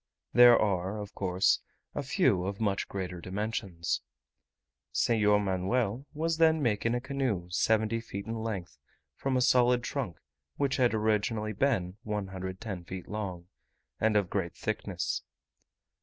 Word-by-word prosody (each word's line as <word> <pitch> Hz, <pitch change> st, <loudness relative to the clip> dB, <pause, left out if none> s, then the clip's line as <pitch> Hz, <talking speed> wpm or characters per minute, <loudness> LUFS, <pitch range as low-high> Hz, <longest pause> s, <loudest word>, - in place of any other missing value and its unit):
There 120 Hz, -1 st, +9 dB
are, 95 Hz, 0 st, 0 dB
of 105 Hz, -1 st, -7 dB
course, 95 Hz, -1 st, +2 dB, 0.3 s
a -, -, -2 dB
few 130 Hz, -8 st, +2 dB
of 100 Hz, +1 st, -3 dB
much 100 Hz, -3 st, 0 dB
greater 90 Hz, -3 st, -5 dB
dimensions. 95 Hz, -2 st, -2 dB, 0.9 s
Senhor 105 Hz, -3 st, +3 dB
Manuel 105 Hz, +6 st, 0 dB
was 165 Hz, +1 st, 0 dB
then 160 Hz, -1 st, +5 dB
making 115 Hz, -3 st, +1 dB
a -, -, +1 dB
canoe 125 Hz, -9 st, -2 dB
70 110 Hz, +4 st, +2 dB
feet 100 Hz, -3 st, -6 dB
in 115 Hz, -, -4 dB
length 110 Hz, -5 st, -4 dB, 0.3 s
from 130 Hz, -, -1 dB
a -, -, +2 dB
solid 125 Hz, -1 st, +4 dB
trunk, 120 Hz, -, -3 dB, 0.4 s
which 140 Hz, -1 st, 0 dB
had 125 Hz, -3 st, +3 dB
originally 110 Hz, 0 st, 0 dB
been 100 Hz, -6 st, 0 dB
110 95 Hz, -2 st, -4 dB
feet 90 Hz, +1 st, -7 dB
long, 95 Hz, -5 st, -4 dB, 0.5 s
and 110 Hz, -1 st, +3 dB
of 100 Hz, -4 st, 0 dB
great -, -, -2 dB
thickness. -, -, -2 dB
105 Hz, 135 wpm, -30 LUFS, 95-120 Hz, 0.9 s, There